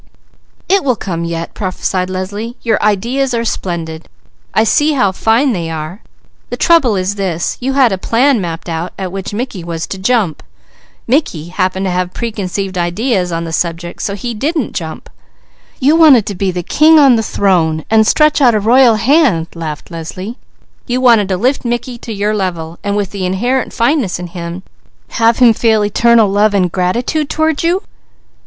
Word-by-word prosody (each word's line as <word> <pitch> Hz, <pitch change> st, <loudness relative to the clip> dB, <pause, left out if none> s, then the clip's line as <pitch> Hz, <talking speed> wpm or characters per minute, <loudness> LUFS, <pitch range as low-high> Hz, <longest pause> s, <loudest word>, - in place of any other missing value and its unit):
"It 395 Hz, 0 st, +2 dB
will 255 Hz, -3 st, +1 dB
come 170 Hz, -6 st, -4 dB
yet," 170 Hz, 0 st, -4 dB
prophesied 185 Hz, -1 st, -2 dB
Leslie. 205 Hz, +6 st, -5 dB
"Your 230 Hz, -, +1 dB
ideas 240 Hz, +6 st, 0 dB
are 230 Hz, 0 st, -1 dB
splendid! 165 Hz, -6 st, -4 dB, 0.4 s
I 220 Hz, -, +2 dB
see 295 Hz, +7 st, +2 dB
how 205 Hz, -9 st, +2 dB
fine 230 Hz, +7 st, +1 dB
they 170 Hz, -4 st, -3 dB
are! 160 Hz, +5 st, -6 dB, 0.5 s
The -, -, -4 dB
trouble 315 Hz, -, +3 dB
is 185 Hz, +1 st, -1 dB
this: 180 Hz, -4 st, -2 dB
you 265 Hz, +2 st, -2 dB
had 265 Hz, -4 st, +4 dB
a 190 Hz, -, -2 dB
plan 245 Hz, +3 st, +2 dB
mapped 170 Hz, -1 st, -5 dB
out 165 Hz, +1 st, -4 dB
at 185 Hz, -2 st, -4 dB
which 195 Hz, 0 st, -5 dB
Mickey 210 Hz, -4 st, -4 dB
was 170 Hz, -1 st, -4 dB
to 195 Hz, -, -7 dB
jump. 200 Hz, -5 st, 0 dB, 0.6 s
Mickey 225 Hz, -, -1 dB
happened 185 Hz, +1 st, -1 dB
to 185 Hz, -, -1 dB
have 180 Hz, 0 st, -2 dB
preconceived 195 Hz, -4 st, -3 dB
ideas 180 Hz, +1 st, -1 dB
on 165 Hz, 0 st, -2 dB
the 165 Hz, -1 st, -6 dB
subject, 170 Hz, +1 st, -3 dB
so 200 Hz, -, -2 dB
he 235 Hz, +4 st, -5 dB
didn't 290 Hz, +4 st, -2 dB
jump. 160 Hz, -3 st, -6 dB, 0.7 s
You 285 Hz, +4 st, +3 dB
wanted 295 Hz, -10 st, +6 dB
to 210 Hz, -, -4 dB
be 195 Hz, +1 st, -1 dB
the 180 Hz, -1 st, -3 dB
king 315 Hz, -, +4 dB
on 275 Hz, -5 st, +6 dB
the 225 Hz, -, +1 dB
throne 170 Hz, -7 st, 0 dB
and 220 Hz, -1 st, +3 dB
stretch 305 Hz, +2 st, +3 dB
out 245 Hz, -4 st, +5 dB
a -, -, +2 dB
royal 235 Hz, +2 st, +5 dB
hand," 230 Hz, -, +2 dB
laughed 160 Hz, -1 st, -7 dB
Leslie. 185 Hz, +8 st, -7 dB, 0.5 s
"You 245 Hz, +1 st, 0 dB
wanted 230 Hz, -6 st, +4 dB
to 185 Hz, -, 0 dB
lift 255 Hz, +8 st, 0 dB
Mickey 240 Hz, 0 st, -3 dB
to 230 Hz, -, -8 dB
your 210 Hz, 0 st, -1 dB
level, 175 Hz, -5 st, -3 dB
and 200 Hz, 0 st, -1 dB
with 200 Hz, -2 st, -2 dB
the 200 Hz, -2 st, -5 dB
inherent 240 Hz, +8 st, -1 dB
fineness 235 Hz, -, 0 dB
in 180 Hz, -, -6 dB
him, 170 Hz, +1 st, -7 dB, 0.5 s
have 230 Hz, 0 st, +2 dB
him 245 Hz, -3 st, +6 dB
feel 220 Hz, -2 st, +2 dB
eternal 230 Hz, +1 st, +4 dB
love 205 Hz, +1 st, +2 dB
and 180 Hz, -3 st, +1 dB
gratitude 240 Hz, -, -1 dB
toward 315 Hz, -1 st, 0 dB
you?" 350 Hz, +4 st, 0 dB
205 Hz, 180 wpm, -14 LUFS, 180-245 Hz, 0.7 s, wanted